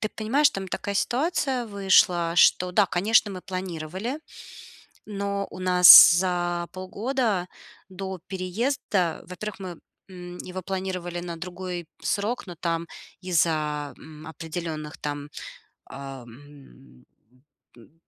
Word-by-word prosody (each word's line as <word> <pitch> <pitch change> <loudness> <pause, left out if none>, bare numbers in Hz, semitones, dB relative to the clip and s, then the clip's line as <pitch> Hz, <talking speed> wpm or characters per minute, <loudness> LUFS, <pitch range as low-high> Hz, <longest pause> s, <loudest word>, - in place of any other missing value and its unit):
Ты 215 - -1
понимаешь, 265 +7 +2
там 190 -1 -6
такая 200 - -4
ситуация 260 - 0
вышла, 185 -4 +3
что 180 +1 +4
да, 205 +3 +4
конечно, 210 +4 +2
мы 185 - -7
планировали, 185 - -5 0.9
но 200 -1 -3
у - - -10
нас 180 -1 +10
за 175 -1 0
полгода 200 0 -2 0.4
до 190 0 -6
переезда, 190 - -2
во-первых, 210 +4 -7
мы, 180 -3 -7 0.3
м, 180 -1 -10
его 185 +1 -7
планировали 185 -2 -4
на 175 -1 -6
другой 180 -1 -6 0.2
срок, 220 +4 -2
но 175 -2 -9
там 165 0 -2 0.3
из-за, 155 -5 0
м, 155 0 -13
определенных 160 -1 -6
там, 145 0 -5 0.6
ам 135 - -12 0.7
м 120 +5 -19
180 Hz, 115 wpm, -25 LUFS, 165-200 Hz, 0.9 s, нас